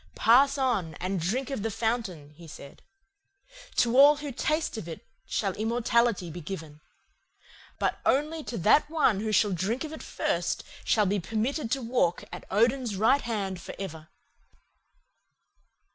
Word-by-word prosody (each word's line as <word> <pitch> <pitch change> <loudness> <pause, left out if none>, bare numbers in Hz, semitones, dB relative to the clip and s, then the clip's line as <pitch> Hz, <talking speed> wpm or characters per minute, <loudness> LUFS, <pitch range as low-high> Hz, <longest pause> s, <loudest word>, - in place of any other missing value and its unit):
"'Pass 275 +5 +5
on 220 - 0
and 185 +3 -3
drink 255 - -2
of 270 - -3
the 225 - -1
fountain,' 215 -9 -3
he 170 +1 -13
said. 140 -3 -12 0.9
'To 240 0 +2
all 285 +3 +8
who 290 -1 -6
taste 310 +4 -1
of 220 -7 -6
it 165 - -8 0.2
shall 195 -3 -1
immortality 230 -3 +1
be 175 +2 -7
given. 155 -3 -8 1.0
But - - -1
only 305 +3 +1
to 235 - -5
that 215 - +4
one 295 -11 +2
who 215 +1 -2
shall 210 0 +3
drink 195 - -1
of 310 0 -6
it 315 - -8
first - - -2 0.2
shall 210 -2 +2
be 200 +1 +1
permitted 225 - -2
to 270 -2 -2
walk 225 -8 0
at - - -8
Odin's 230 +2 +1
right 225 +8 +3
hand 195 -6 -3
forever. 160 -5 -8
225 Hz, 150 wpm, -28 LUFS, 185-260 Hz, 1.0 s, all